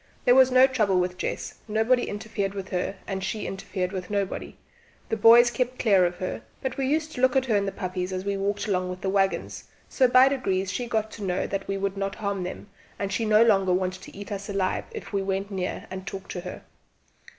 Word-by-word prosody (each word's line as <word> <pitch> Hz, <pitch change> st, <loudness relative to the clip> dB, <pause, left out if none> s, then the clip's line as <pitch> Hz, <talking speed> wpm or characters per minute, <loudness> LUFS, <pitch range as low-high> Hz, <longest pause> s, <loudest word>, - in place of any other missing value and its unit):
There 245 Hz, -, +6 dB
was 260 Hz, 0 st, +7 dB
no 255 Hz, 0 st, +7 dB
trouble 215 Hz, -8 st, +2 dB
with 180 Hz, 0 st, -2 dB
Jess; -, -, -3 dB
nobody 225 Hz, +3 st, +2 dB
interfered 205 Hz, -1 st, -3 dB
with 195 Hz, -1 st, -5 dB
her, 185 Hz, +1 st, -2 dB
and 190 Hz, -1 st, -4 dB
she 215 Hz, +1 st, -3 dB
interfered 185 Hz, -1 st, -3 dB
with 185 Hz, -2 st, -5 dB
nobody. 200 Hz, -2 st, -3 dB, 0.5 s
The 225 Hz, -, +1 dB
boys 235 Hz, +2 st, +7 dB
kept 250 Hz, 0 st, -2 dB
clear 195 Hz, -6 st, +4 dB
of 175 Hz, -, -5 dB
her; 185 Hz, +1 st, -4 dB, 0.2 s
but 265 Hz, -1 st, -2 dB
we 270 Hz, -1 st, -1 dB
used 310 Hz, +2 st, 0 dB
to -, -, -10 dB
take -, -, -3 dB
a -, -, -2 dB
look 260 Hz, 0 st, +4 dB
at 265 Hz, -1 st, +3 dB
her 230 Hz, -4 st, +1 dB
and 200 Hz, -1 st, +1 dB
the -, -, -1 dB
puppies 185 Hz, -1 st, -4 dB
as 185 Hz, +1 st, -4 dB
we 200 Hz, 0 st, 0 dB
walked 200 Hz, +1 st, -1 dB
along 185 Hz, -2 st, 0 dB
with 180 Hz, 0 st, -6 dB
the 190 Hz, -, -1 dB
waggons; 195 Hz, -1 st, 0 dB, 0.2 s
so 260 Hz, -, +3 dB
by 255 Hz, +2 st, +7 dB
degrees 195 Hz, -9 st, 0 dB
she 245 Hz, +4 st, -3 dB
got 220 Hz, -1 st, -1 dB
to 210 Hz, -, -8 dB
know 180 Hz, -1 st, -1 dB
that 195 Hz, -1 st, -4 dB
we 195 Hz, -, -1 dB
would 195 Hz, 0 st, -2 dB
not 195 Hz, 0 st, -2 dB
harm 200 Hz, -2 st, -2 dB
them, 180 Hz, +2 st, -6 dB, 0.3 s
and 200 Hz, 0 st, -3 dB
she 225 Hz, +3 st, 0 dB
no 215 Hz, +1 st, +6 dB
longer 195 Hz, -5 st, +3 dB
wanted 185 Hz, 0 st, -1 dB
to -, -, -12 dB
eat 205 Hz, +1 st, -8 dB
us 200 Hz, 0 st, -5 dB
alive 195 Hz, -2 st, -1 dB
if 440 Hz, -, -9 dB
we 200 Hz, -, +1 dB
went 195 Hz, +1 st, -2 dB
near 185 Hz, -2 st, -3 dB
and 190 Hz, 0 st, -7 dB
talked 195 Hz, -1 st, -6 dB
to 180 Hz, -, -4 dB
her. 180 Hz, 0 st, -8 dB
200 Hz, 240 wpm, -26 LUFS, 190-230 Hz, 0.5 s, was